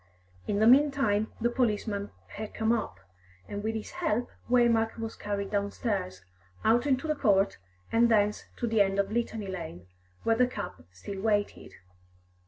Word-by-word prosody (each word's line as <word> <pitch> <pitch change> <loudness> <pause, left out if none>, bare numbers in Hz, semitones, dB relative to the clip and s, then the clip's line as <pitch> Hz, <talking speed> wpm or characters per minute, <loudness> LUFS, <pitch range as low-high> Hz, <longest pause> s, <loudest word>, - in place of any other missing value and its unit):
In 200 - 0
the 215 - +4
meantime 255 -5 +4
the 235 +1 +1
policeman 210 -4 0 0.2
had 215 0 -7
come 220 0 +1
up, 225 - -2 0.5
and 205 0 -5
with 220 +1 -1
his 220 - -5
help 315 -10 -1 0.2
Waymark 235 -2 +3
was 225 0 -5
carried 200 -1 -3
downstairs, 200 - -2 0.4
out 240 +5 +4
into 275 +2 +1
the 305 - +2
court, 200 - +2 0.3
and 235 +1 +4
thence 210 -2 +2
to - - -2
the 225 -2 +3
end 195 0 +2
of 200 0 +1
Litany 225 -2 -2
Lane, 165 - -6 0.4
where 225 - +3
the 250 +2 +4
cab 90 - -6
still 190 - -7
waited. 205 -1 -1
220 Hz, 160 wpm, -29 LUFS, 200-235 Hz, 0.5 s, the